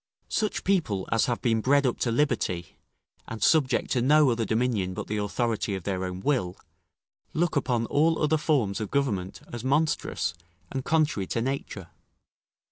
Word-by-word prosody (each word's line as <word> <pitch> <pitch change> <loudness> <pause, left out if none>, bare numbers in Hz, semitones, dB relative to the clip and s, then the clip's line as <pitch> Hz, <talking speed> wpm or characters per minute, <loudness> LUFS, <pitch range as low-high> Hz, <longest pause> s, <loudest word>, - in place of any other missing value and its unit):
Such 215 -1 -1
people 155 - 0
as 115 - +3
have 120 -2 -2
been 115 -2 +2
bred 140 +4 +3
up 125 - 0
to 120 - 0
liberty, 105 - -1 0.5
and 110 - -5
subject 150 -5 +3
to 125 - +2
no 145 +1 +5
other 115 -1 0
dominion 110 -6 0
but - - -4
the 105 - -3
authority 105 0 -1
of 95 - -6
their 95 -1 -2
own 90 0 -5
will, 95 -8 0 0.8
look 170 0 +1
upon 125 -4 +1
all 160 +6 +2
other 155 +1 +2
form 140 -10 +1
of 110 - -4
government 105 -10 -1
as 120 -1 -5
monstrous 135 - 0 0.4
and 135 - -3
contrary 150 -12 +1
to 115 - -1
nature. 120 -9 -4
120 Hz, 165 wpm, -27 LUFS, 100-145 Hz, 0.8 s, no